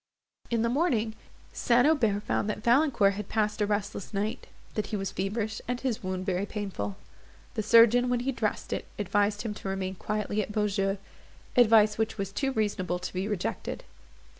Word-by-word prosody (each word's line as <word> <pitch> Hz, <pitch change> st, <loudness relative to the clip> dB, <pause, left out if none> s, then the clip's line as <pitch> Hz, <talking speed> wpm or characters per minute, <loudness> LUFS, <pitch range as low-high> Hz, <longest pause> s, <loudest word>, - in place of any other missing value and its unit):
In 230 Hz, -1 st, +1 dB
the -, -, +2 dB
morning 235 Hz, -5 st, +1 dB, 0.4 s
St. 245 Hz, +1 st, +3 dB
Aubert 225 Hz, -10 st, +2 dB
found 210 Hz, -, 0 dB
that 210 Hz, 0 st, -4 dB
Valancourt 240 Hz, -5 st, +4 dB
had 205 Hz, 0 st, -6 dB
passed 215 Hz, -1 st, 0 dB
a 205 Hz, -, +2 dB
restless 205 Hz, -1 st, -3 dB
night; 210 Hz, +2 st, -2 dB, 0.3 s
that 210 Hz, -2 st, -2 dB
he 215 Hz, -, -3 dB
was 195 Hz, -2 st, -2 dB
feverish, 215 Hz, +3 st, -2 dB
and 245 Hz, 0 st, -1 dB
his 250 Hz, -3 st, -2 dB
wound 185 Hz, -1 st, -3 dB
very 190 Hz, +1 st, -1 dB
painful. 190 Hz, -, -4 dB, 0.6 s
The -, -, -1 dB
surgeon, 235 Hz, +3 st, +6 dB
when 245 Hz, -1 st, +1 dB
he 265 Hz, +2 st, 0 dB
dressed 220 Hz, -5 st, -2 dB
it, -, -, -4 dB
advised 205 Hz, +1 st, +1 dB
him 220 Hz, -3 st, -3 dB
to 200 Hz, -, -6 dB
remain 190 Hz, -1 st, -2 dB
quietly 210 Hz, +2 st, -2 dB
at 210 Hz, -, -5 dB
Beaujeu; 200 Hz, -2 st, 0 dB, 0.6 s
advice 220 Hz, -3 st, +5 dB
which 220 Hz, 0 st, 0 dB
was 195 Hz, -1 st, -3 dB
too 270 Hz, +7 st, -1 dB
reasonable 200 Hz, -6 st, -1 dB
to 180 Hz, -, -6 dB
be 190 Hz, +2 st, -2 dB
rejected. 210 Hz, -4 st, -3 dB
210 Hz, 180 wpm, -28 LUFS, 195-230 Hz, 0.6 s, surgeon